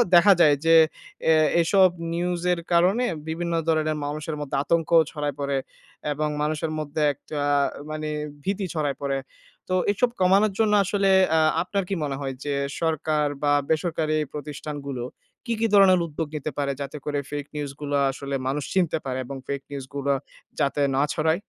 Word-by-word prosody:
দেখা 195 +3 +8
যায় 150 -3 +6
যে, 165 0 +6 0.5
অ্যা 160 -1 +5 0.3
এসব 185 +2 +5 0.2
নিউজ 175 0 -1
এর 170 - -2
কারণে 190 +9 +3 0.2
বিভিন্ন 170 +1 -2
ধরনের 155 -1 +1
মানুষের 150 +1 -4
মধ্যে 140 -1 -4
আতঙ্ক 165 +1 +1 0.2
ছড়ায় 145 -3 -3
পড়ে 140 -1 -1 0.6
এবং 150 +1 -1
মানুষের 155 +1 -1
মধ্যে 155 +1 -3
একটা 145 +2 -6 0.5
মানে 155 0 -4 0.3
ভীতি 195 0 -1
ছড়ায় 145 -3 -1
পড়ে। 135 -1 -1 0.5
তো - - 0 0.2
এসব 240 +4 +1
কমানোর 195 +3 +4
জন্য 215 -2 +3
আসলে 195 0 +1 0.2
অ্যা 160 - +3 0.2
আপনার 195 +2 -1
কি 195 - 0
মনে 140 -2 -2
হয় 135 -1 -3
যে, 145 - -2 0.3
সরকার 155 -2 +1 0.2
বা 145 - +3 0.2
বেসরকারি 155 -1 0 0.2
প্রতিষ্ঠানগুলো 145 -3 -5 0.4
কি, 235 - -1
কি 225 - +2
ধরনের 190 -2 +7
উদ্যোগ 160 0 -4
নিতে 150 +1 -3
পারে 140 -1 0
যাতে 140 +2 -5
করে 145 -1 -1
ফেক 145 -1 -3
নিউজ 145 -2 -3
গুলো 145 0 -2 0.2
আসলে 140 0 -5
মানুষ 140 +1 -1
চিনতে 180 -5 +2
পারে 130 -1 -2
এবং 135 +1 -6
ফেক 140 -1 -3
নিউজগুলো 140 0 -2 0.5
যাতে 145 0 +1
না 135 - +3
ছড়ায়? 160 +1 +1
155 Hz, 165 wpm, -25 LUFS, 145-175 Hz, 0.6 s, দেখা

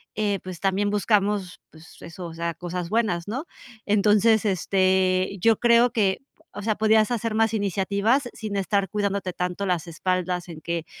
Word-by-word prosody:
eh, 205 -2 0
pues, 185 -2 -8
también 200 +1 0
buscamos, 205 -2 0
pues, 160 0 -16
eso, 170 +2 -9
o 165 - -7
sea, 170 0 -3
cosas 175 0 -5
buenas, 205 -6 0
¿no? 265 +10 -4 0.4
Entonces, 210 +1 +3
este, 185 0 +1
yo 225 +2 +4
creo 235 0 +4
que, 195 -4 +1 0.3
o 205 - -7
sea, 215 0 0
podías 220 +1 +3
hacer 230 -1 -1
más 225 0 +2
iniciativas 205 +5 0
sin 215 -2 -6
estar 200 0 0
cuidándote 200 -3 -2
tanto 180 +2 -3
las 180 -2 -1
espaldas 180 +1 -2
en 160 -2 -10
que, 170 0 -3
200 Hz, 165 wpm, -24 LUFS, 180-215 Hz, 0.4 s, yo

